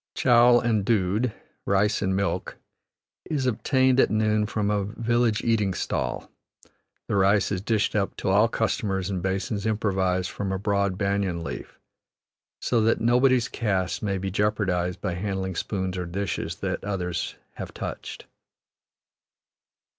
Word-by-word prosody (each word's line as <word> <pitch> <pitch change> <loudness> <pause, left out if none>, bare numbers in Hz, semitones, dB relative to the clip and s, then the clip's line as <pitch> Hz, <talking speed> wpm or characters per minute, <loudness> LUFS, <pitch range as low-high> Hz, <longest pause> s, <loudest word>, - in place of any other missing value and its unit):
Chowel 120 -1 +6
and 115 -4 +1
dood 105 +2 +1 0.3
(rice 100 +2 +2
and 95 -1 0
milk) 100 0 -2 0.7
is 145 -4 -1
obtained 130 +2 +2
at - - +5
noon 110 -1 +1
from 105 -2 -1
a 100 -1 +1
village 115 +1 0
eating 105 -5 +1
stall; 60 -7 -3 0.8
the - - -1
rice 100 0 +3
is 95 -3 -1
dished 110 0 0
up 100 -2 0
to - - -2
all 105 +4 +5
customers 100 -4 -1
in 95 -2 -2
basins 95 +2 -2
improvised 95 -4 0
from 100 -1 -3
a 95 - -1
broad 100 -1 0
banyan 100 -4 -1
leaf, - - -7 0.8
so 120 -2 +1
that 115 +1 +2
nobody's 125 +1 +3
caste 95 -5 -1
may 100 -2 -1
be 95 +1 -3
jeopardized 95 -4 0
by 90 - -2
handling 95 0 -3
spoons 95 0 -2
or 90 - -3
dishes 100 +3 -3
that - - -3
others 90 -4 -3 0.2
have - - -6
touched. - - -7
100 Hz, 140 wpm, -25 LUFS, 95-110 Hz, 0.8 s, Chowel